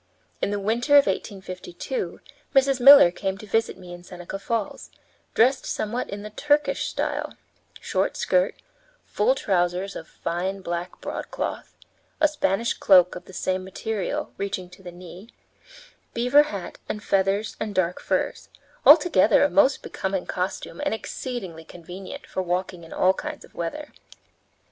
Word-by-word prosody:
In -, -, +1 dB
the 205 Hz, 0 st, -1 dB
winter 230 Hz, +8 st, 0 dB
of 285 Hz, -1 st, +8 dB
1852 195 Hz, -, -4 dB, 0.3 s
Mrs. 270 Hz, -1 st, +4 dB
Miller 275 Hz, -7 st, +9 dB
came 190 Hz, +1 st, -3 dB
to 215 Hz, -, -10 dB
visit 225 Hz, +1 st, 0 dB
me 180 Hz, -2 st, -10 dB
in 175 Hz, -, -10 dB
Seneca 180 Hz, +2 st, -8 dB
Falls, 220 Hz, 0 st, -3 dB, 0.5 s
dressed 260 Hz, +4 st, +3 dB
somewhat 230 Hz, +4 st, -2 dB
in 205 Hz, +1 st, -6 dB
the 210 Hz, -, -8 dB
Turkish 295 Hz, +6 st, +1 dB
style -, -, -3 dB, 0.4 s
short -, -, -1 dB
skirt, -, -, +1 dB, 0.5 s
full -, -, +1 dB
trousers 185 Hz, -, 0 dB
of 165 Hz, -, -7 dB
fine 185 Hz, +3 st, -3 dB
black 175 Hz, 0 st, -5 dB
broadcloth; -, -, -5 dB, 0.4 s
a 310 Hz, -, +5 dB
Spanish 235 Hz, -7 st, 0 dB
cloak, 180 Hz, -2 st, +5 dB
of 180 Hz, -, -9 dB
the -, -, -13 dB
same 185 Hz, 0 st, -1 dB
material, 200 Hz, +1 st, -3 dB
reaching 195 Hz, -2 st, -4 dB
to 185 Hz, +2 st, -15 dB
the 180 Hz, -2 st, -9 dB
knee; 180 Hz, +4 st, -12 dB, 0.9 s
beaver 250 Hz, +5 st, +5 dB
hat 195 Hz, -4 st, -7 dB
and 210 Hz, -, -4 dB
feathers 195 Hz, +2 st, +1 dB
and 215 Hz, -1 st, -4 dB
dark 180 Hz, -1 st, +1 dB
furs; -, -, -2 dB, 0.3 s
altogether 295 Hz, -, +6 dB
a 290 Hz, -, +2 dB
most 280 Hz, -2 st, +3 dB
becoming 190 Hz, -1 st, -3 dB
costume 185 Hz, +9 st, -4 dB
and 290 Hz, -6 st, 0 dB
exceedingly 215 Hz, -9 st, -6 dB
convenient 180 Hz, +3 st, -10 dB
for 185 Hz, -, -3 dB
walking 180 Hz, -1 st, -2 dB
in 165 Hz, -, -13 dB
all 185 Hz, +1 st, +3 dB
kinds 300 Hz, +8 st, -7 dB
of -, -, -24 dB
weather. 170 Hz, -, -5 dB
195 Hz, 150 wpm, -24 LUFS, 180-245 Hz, 0.9 s, Miller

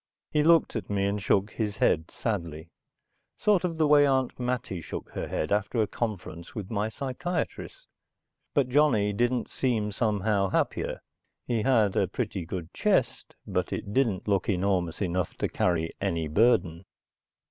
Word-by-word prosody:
He 150 Hz, -, +3 dB
looked 165 Hz, -2 st, +4 dB
at 110 Hz, -, -4 dB
me 100 Hz, -1 st, 0 dB
and 100 Hz, +1 st, -1 dB
shook 100 Hz, +1 st, +1 dB
his 105 Hz, -2 st, -3 dB
head 80 Hz, +1 st, +2 dB
sadly. 85 Hz, -7 st, -4 dB, 0.7 s
Sort 205 Hz, -4 st, +3 dB
of 170 Hz, -3 st, -2 dB
the 160 Hz, -, +3 dB
way 145 Hz, -1 st, +6 dB
Aunt 130 Hz, -2 st, 0 dB
Mattie 125 Hz, -8 st, -2 dB
shook -, -, -7 dB
her -, -, -4 dB
head 75 Hz, -, -2 dB
after 105 Hz, +3 st, 0 dB
a 110 Hz, -, +4 dB
conference 100 Hz, -7 st, -5 dB
with 105 Hz, -2 st, -6 dB
my 105 Hz, 0 st, 0 dB
psychiatrist. 175 Hz, -, -4 dB, 0.7 s
But 140 Hz, -3 st, +3 dB
Johnny 125 Hz, -7 st, +3 dB
didn't 120 Hz, +3 st, 0 dB
seem 110 Hz, -5 st, -1 dB
somehow 100 Hz, -2 st, +1 dB
happier. -, -, -1 dB, 0.4 s
He 115 Hz, -2 st, 0 dB
had 110 Hz, -6 st, +3 dB
a -, -, +2 dB
pretty 85 Hz, -4 st, -4 dB
good 85 Hz, -2 st, -6 dB
chest, -, -, 0 dB
but -, -, -2 dB
it 100 Hz, -, -4 dB
didn't 115 Hz, -8 st, +1 dB
look 100 Hz, +2 st, +1 dB
enormous 95 Hz, -2 st, 0 dB
enough 90 Hz, -2 st, -2 dB
to -, -, 0 dB
carry 80 Hz, -2 st, 0 dB
any 80 Hz, -2 st, -1 dB
burden. 85 Hz, -2 st, +2 dB
105 Hz, 160 wpm, -27 LUFS, 95-125 Hz, 0.7 s, way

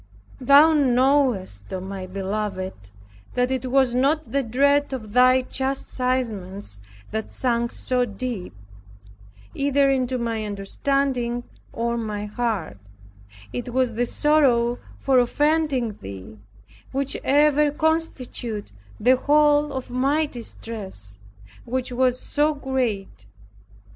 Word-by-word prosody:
Thou 280 Hz, +5 st, +6 dB
knowest, 255 Hz, -, +2 dB
O 190 Hz, -, -3 dB
my 190 Hz, 0 st, -6 dB
Beloved, 190 Hz, -, -4 dB, 0.5 s
that 250 Hz, +1 st, +1 dB
it 260 Hz, -1 st, -2 dB
was 265 Hz, -1 st, +3 dB
not 285 Hz, +5 st, +1 dB
the 280 Hz, -, +2 dB
dread 280 Hz, +4 st, +2 dB
of 215 Hz, -5 st, -6 dB
Thy 255 Hz, +1 st, +5 dB
chastisements 250 Hz, -, -3 dB, 0.3 s
that 220 Hz, 0 st, -4 dB
sunk 235 Hz, -2 st, 0 dB
so 250 Hz, -1 st, 0 dB
deep, 210 Hz, -, -5 dB, 1.0 s
either 280 Hz, 0 st, +2 dB
into 255 Hz, -1 st, 0 dB
my 230 Hz, -2 st, -2 dB
understanding 240 Hz, +4 st, -1 dB, 0.3 s
or 235 Hz, +1 st, -1 dB
my 210 Hz, -2 st, -3 dB
heart; 210 Hz, -, -3 dB, 0.7 s
it 245 Hz, 0 st, -4 dB
was 255 Hz, -2 st, +1 dB
the 240 Hz, +2 st, 0 dB
sorrow 245 Hz, -6 st, +2 dB, 0.2 s
for 265 Hz, -2 st, +3 dB
offending 285 Hz, -3 st, +1 dB
Thee 100 Hz, +2 st, -9 dB, 0.5 s
which 275 Hz, +1 st, -1 dB
ever 295 Hz, +1 st, +4 dB
constituted 285 Hz, -, -2 dB, 0.3 s
the 255 Hz, +4 st, +4 dB
whole 295 Hz, +1 st, +3 dB
of 260 Hz, -2 st, -5 dB
my 275 Hz, +5 st, +2 dB
distress; 210 Hz, -, -7 dB, 0.4 s
which 255 Hz, +1 st, -3 dB
was 250 Hz, 0 st, +1 dB
so 300 Hz, +1 st, +1 dB
great. 230 Hz, -, -3 dB
250 Hz, 110 wpm, -23 LUFS, 215-275 Hz, 1.0 s, Thou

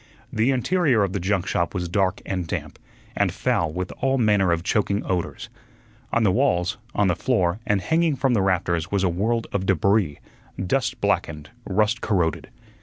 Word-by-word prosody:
The 110 Hz, +3 st, +2 dB
interior 135 Hz, -, +2 dB
of 95 Hz, -2 st, -2 dB
the 100 Hz, -, -1 dB
junk 95 Hz, 0 st, 0 dB
shop 85 Hz, +1 st, -1 dB
was 90 Hz, -2 st, -2 dB
dark 95 Hz, +5 st, 0 dB
and 90 Hz, -3 st, -3 dB
damp, -, -, -5 dB, 0.4 s
and -, -, +1 dB
foul 80 Hz, -3 st, 0 dB
with 90 Hz, +2 st, -4 dB
all 135 Hz, 0 st, +1 dB
manner 105 Hz, -6 st, +3 dB
of 85 Hz, 0 st, 0 dB
choking 100 Hz, 0 st, 0 dB
odors. 90 Hz, +4 st, -3 dB, 0.6 s
On 120 Hz, -, +2 dB
the 100 Hz, -, +4 dB
walls, 105 Hz, -5 st, +1 dB, 0.2 s
on 105 Hz, -, +3 dB
the 90 Hz, -, +2 dB
floor, 95 Hz, -3 st, 0 dB
and 105 Hz, -2 st, +2 dB
hanging 160 Hz, -, +1 dB
from 130 Hz, 0 st, +1 dB
the 105 Hz, -, +2 dB
rafters 85 Hz, -3 st, 0 dB
was 100 Hz, -2 st, 0 dB
a 95 Hz, -, +3 dB
world 110 Hz, +7 st, 0 dB
of 95 Hz, -1 st, -1 dB
debris, 95 Hz, -3 st, +2 dB, 0.5 s
dust 125 Hz, +5 st, 0 dB
blackened, 80 Hz, -7 st, -1 dB
rust 105 Hz, +4 st, +1 dB
corroded. 90 Hz, -6 st, 0 dB
100 Hz, 180 wpm, -23 LUFS, 90-115 Hz, 0.6 s, the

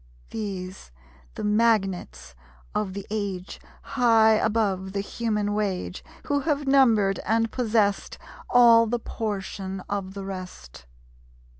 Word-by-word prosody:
These, 190 Hz, -, -6 dB, 0.5 s
the -, -, -5 dB
magnates 195 Hz, -, 0 dB, 0.4 s
of 200 Hz, -3 st, -2 dB
the 200 Hz, -1 st, -6 dB
age, 200 Hz, -4 st, -4 dB, 0.2 s
High 230 Hz, -4 st, +4 dB
above 210 Hz, -4 st, 0 dB
the 200 Hz, -, -1 dB
human 210 Hz, 0 st, -2 dB
wage, 200 Hz, -3 st, -3 dB, 0.2 s
Who 285 Hz, -1 st, +1 dB
have 290 Hz, -1 st, -1 dB
numbered 225 Hz, -8 st, +4 dB
and 225 Hz, 0 st, 0 dB
possesst 215 Hz, -5 st, 0 dB, 0.3 s
All 230 Hz, -2 st, +6 dB
the 240 Hz, +2 st, 0 dB
portion 195 Hz, -4 st, -5 dB
of 195 Hz, 0 st, -5 dB
the 195 Hz, -1 st, -6 dB
rest! 180 Hz, -, -9 dB
205 Hz, 115 wpm, -25 LUFS, 190-230 Hz, 0.5 s, All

